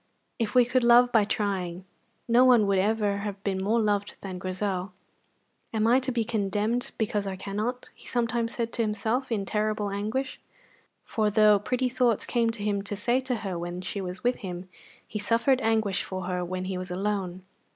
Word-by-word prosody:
If 225 -1 -1
we 250 -1 +7
could 250 +1 +1
love 240 +1 +6
by 220 -3 +4
trying, 190 -4 -2 0.4
no 240 +2 +5
one 245 -4 +6
would 200 -1 +2
ever 205 0 +1
have 200 -1 -5
been 190 -2 -1
more 220 +4 +2
loved 205 -2 0
than 185 -2 -6
Grizel. 185 0 -3 0.8
"Am 220 -2 +1
I 240 +3 +5
to 260 0 -2
be 235 -2 0
condemned 220 +1 -1
because 210 -2 -1
I 190 - -3
cannot?" 210 +6 -3
he - - -16
sometimes 235 -1 -1
said 230 -1 -2
to 235 - 0
himself 220 +4 -1
in 205 -3 0
terrible 210 0 -1
anguish; 215 +7 -2 0.6
for 215 -2 0
though 210 0 +5
pretty 250 +5 0
thoughts 245 -3 +1
came 235 -2 +1
to 225 -2 -4
him 205 -1 0
to 205 +1 -5
say 240 +5 +1
to 260 -1 -2
her 185 -3 -3
when 175 +1 -4
she 195 +2 -4
was 180 0 -6
with 245 +1 +2
him, 180 -3 -6 0.4
he 210 - -4
suffered 235 +5 +2
anguish 220 -4 +1
for 185 -1 -5
her 180 0 -2
when 185 +1 -4
he 185 -1 -3
was 185 0 -6
alone. 190 -1 -2
210 Hz, 195 wpm, -27 LUFS, 195-235 Hz, 0.8 s, we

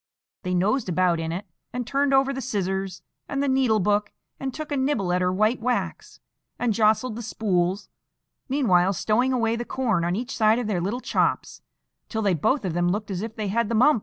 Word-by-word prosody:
They 180 -2 -2
nosed 205 +6 +1
about 180 -1 +2
in 160 0 -3
it, 185 +5 -4 0.3
and 245 0 -3
turned 275 +3 +1
over 270 0 +3
the 265 - -4
scissors 190 -4 -3 0.3
and 280 0 -1
the - - 0
needle 260 -5 +3
book, 205 +2 +1 0.3
and 270 -1 -3
took 310 +3 -7
a - - +1
nibble 260 -10 0
at 180 - +1
her 180 0 +2
white 215 +5 +1
wax, 245 +1 -2 0.4
and 240 -3 +1
jostled 220 +2 +2
the 235 - -5
spools, 195 -4 -1 0.6
meanwhile 195 -9 +3
stowing 240 +7 +1
away 230 -3 +1
the 235 - -3
corn 230 -9 0
on 175 +1 0
each 245 +5 -4
side 220 0 +4
of 245 - -2
their 200 -5 -1
little 210 +8 -2
chops, - - -1 0.5
till 220 -1 -2
they 200 -2 +3
both 215 - +1
of 180 - -1
them 175 +1 +1
looked 205 +2 -2
as 185 -1 -3
if 225 0 -5
they 215 -3 -3
had 230 +1 0
the 230 - 0
mumps. 250 +3 +5
215 Hz, 215 wpm, -25 LUFS, 185-250 Hz, 0.6 s, mumps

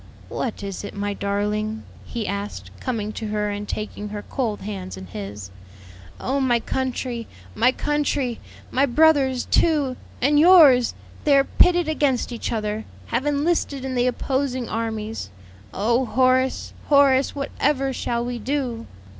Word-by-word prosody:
"What 230 -5 -4
is 195 -1 -5
it, 205 - -7
my 205 0 -2
darling?" 210 +2 -2 0.2
he 230 -3 -4
asked, 200 +1 -5
coming 220 -5 -2
to 220 - -5
her 210 0 -1
and 205 0 -5
taking 210 -1 -4
her 205 0 -6
cold 230 -6 -3
hands 195 -2 -6
in 95 - -8
his. 100 0 -7 0.7
"Oh 270 +2 -1
my 245 -3 +2
country! 250 -1 -3 0.3
my 240 +4 +4
country! 285 -4 -1 0.3
My 275 +2 +3
brothers, 270 -2 +3
too 290 -6 +2 0.2
and 290 +3 +3
yours! 300 -8 +7 0.3
they 285 -2 +5
are 275 - +5
pitted 350 +3 +3
against 285 -6 +1
each 235 - -4
other 215 -1 -2 0.3
have 255 +5 +1
enlisted 290 -2 0
in 265 - -3
the 245 0 +2
opposing 260 -1 -1
armies. 220 - -3 0.4
Oh, 235 +6 +1
Horace, 260 +1 +2
Horace! 280 -2 +4
what 280 0 -4
ever 275 -2 +1
shall 235 -1 -2
we 245 -1 -4
do?" 245 -2 -2
245 Hz, 145 wpm, -23 LUFS, 215-275 Hz, 0.7 s, yours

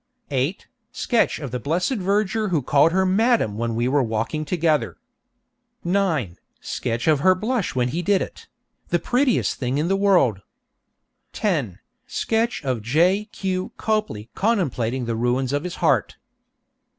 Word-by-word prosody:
8. 140 +7 -1 0.3
Sketch 235 -2 +1
of 140 -6 -6
the 125 - -3
blessed 175 - 0
verger 205 +2 0
who 160 -7 0
called 145 +5 +4
her 190 +2 +2
'Madam' 210 - +2
when 115 -1 -1
we 120 +2 0
were 140 +2 +2
walking 115 +6 -2
together. 160 -2 0 0.9
9. 170 - 0 0.2
Sketch 120 +2 -3
of 155 -3 +4
her 185 +5 +4
blush 215 - -2
when 125 -1 +1
he 165 +7 -2
did 195 +2 +2
it; - - -7 0.4
the - - +1
prettiest 250 0 +1
thing 130 +1 -1
in 155 +4 0
the 195 - +3
world. 180 - +3 0.9
10. 145 - -1 0.3
Sketch 225 -6 -1
of 130 -4 -1
J. 175 - +2
Q. 190 -3 -4
Copley 210 - -2
contemplating 130 - 0
the 115 -1 -2
ruins 125 +3 0
of 145 +1 0
his 180 -1 -5
heart. - - +2
160 Hz, 150 wpm, -23 LUFS, 125-195 Hz, 0.9 s, called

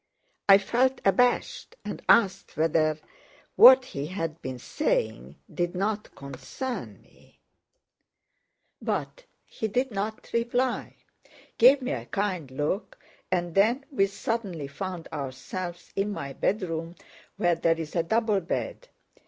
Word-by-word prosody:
I 195 - +10
felt 255 +6 +1
abashed 250 - +2
and - - -5
asked 195 -4 +3
whether 155 -1 +2 0.6
what 260 0 +9
he 140 - -5
had 165 -2 -4
been 130 0 -5
saying 65 - -2 0.2
did 175 +1 -1
not 210 +3 -2
concern 240 - -6
me; - - -24 1.4
but - - -3 0.2
he 220 - -4
did 250 +5 0
not 210 +2 -4
reply, 245 +2 0 0.6
gave 260 +3 +7
me 250 - -2
a - - -4
kind 190 -8 -2
look, 155 - -3 0.3
and 175 -2 0
then 230 - +3
we 195 -8 +3
suddenly 195 -7 -3
found 175 +4 -6
ourselves 155 +6 -6
in 200 +1 0
my 140 -8 -5
bedroom 165 -2 -2 0.4
where 175 -1 +3
there 165 0 +1
is 155 -2 -6
a 170 - +3
double 215 +3 +1
bed. 190 - -4
195 Hz, 125 wpm, -27 LUFS, 165-235 Hz, 1.4 s, I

